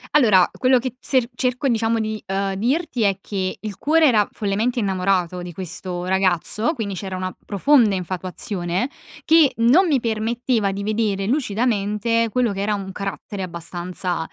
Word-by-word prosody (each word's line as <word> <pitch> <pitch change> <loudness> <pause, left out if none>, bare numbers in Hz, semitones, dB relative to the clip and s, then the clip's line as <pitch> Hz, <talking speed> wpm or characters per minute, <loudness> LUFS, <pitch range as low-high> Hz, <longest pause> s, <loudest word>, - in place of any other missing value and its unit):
Allora 210 -11 +6
quello 255 0 +4
che 250 +1 -2
t - - -34
ser 255 -3 +1
cerco 250 +2 -1
diciamo 230 -1 +1
di, 215 0 -3
uhm, 195 0 -1
dirti 255 - -1
è 200 -2 +2
che 190 -2 -3
il 215 -2 -6
cuore 320 +2 +4
era 220 -7 +3
follemente 215 +4 -1
innamorato 185 -3 0
di 175 -1 -7
questo 180 0 -5
ragazzo, 190 - +1
quindi 215 -6 -3
c'era 190 0 -5
una 185 0 -4
profonda 220 0 +3
infatuazione 185 +3 -3 0.3
che 320 -3 +5
non 255 +12 +5
mi 285 -5 +2
permetteva 230 -1 0
di 200 +1 -4
vedere 210 -2 0
lucidamente 230 -2 0
quello 235 -1 +1
che 195 - -4
era 210 +1 0
un 195 -1 -6
carattere 200 +1 -5
abbastanza 175 0 -4
205 Hz, 160 wpm, -21 LUFS, 190-240 Hz, 0.3 s, Allora